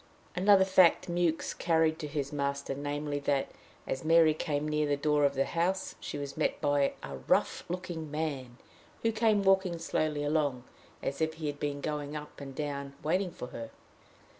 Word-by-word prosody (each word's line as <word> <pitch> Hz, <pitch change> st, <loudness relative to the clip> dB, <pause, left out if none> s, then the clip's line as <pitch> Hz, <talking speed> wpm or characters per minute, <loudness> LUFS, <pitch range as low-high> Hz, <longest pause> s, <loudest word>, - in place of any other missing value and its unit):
Another 190 Hz, +1 st, +6 dB
fact 185 Hz, -2 st, +5 dB
Mewks 170 Hz, -2 st, 0 dB
carried 160 Hz, -1 st, +2 dB
to 150 Hz, -, -4 dB
his 145 Hz, -1 st, -3 dB
master 140 Hz, -1 st, -1 dB
namely, 145 Hz, +1 st, -3 dB
that, 140 Hz, -1 st, 0 dB, 0.3 s
as 130 Hz, -, -3 dB
Mary 165 Hz, -1 st, +6 dB
came 150 Hz, -1 st, -2 dB
near 150 Hz, 0 st, +1 dB
the 145 Hz, 0 st, +1 dB
door 150 Hz, 0 st, +2 dB
of 140 Hz, 0 st, +1 dB
the 135 Hz, +1 st, +2 dB
house, 180 Hz, +3 st, -1 dB
she -, -, -5 dB
was 140 Hz, -1 st, -5 dB
met -, -, 0 dB
by 145 Hz, -1 st, +2 dB
"a 70 Hz, -1 st, -6 dB
rough -, -, +2 dB
looking 175 Hz, -3 st, -4 dB
man," 140 Hz, -5 st, -3 dB, 0.5 s
who 225 Hz, -, +3 dB
came 215 Hz, -2 st, +2 dB
walking 190 Hz, -2 st, +3 dB
slowly 155 Hz, -2 st, -1 dB
along, 145 Hz, -4 st, 0 dB, 0.4 s
as 140 Hz, +3 st, -3 dB
if 160 Hz, 0 st, 0 dB
he 160 Hz, -, -6 dB
had 145 Hz, -1 st, -3 dB
been 145 Hz, -1 st, -2 dB
going 150 Hz, 0 st, -3 dB
up 150 Hz, -1 st, -8 dB
and 135 Hz, -1 st, -8 dB
down 140 Hz, -1 st, -4 dB
waiting 180 Hz, +4 st, +1 dB
for 125 Hz, -7 st, -8 dB
her. 115 Hz, -1 st, -7 dB
150 Hz, 180 wpm, -30 LUFS, 140-165 Hz, 0.5 s, Another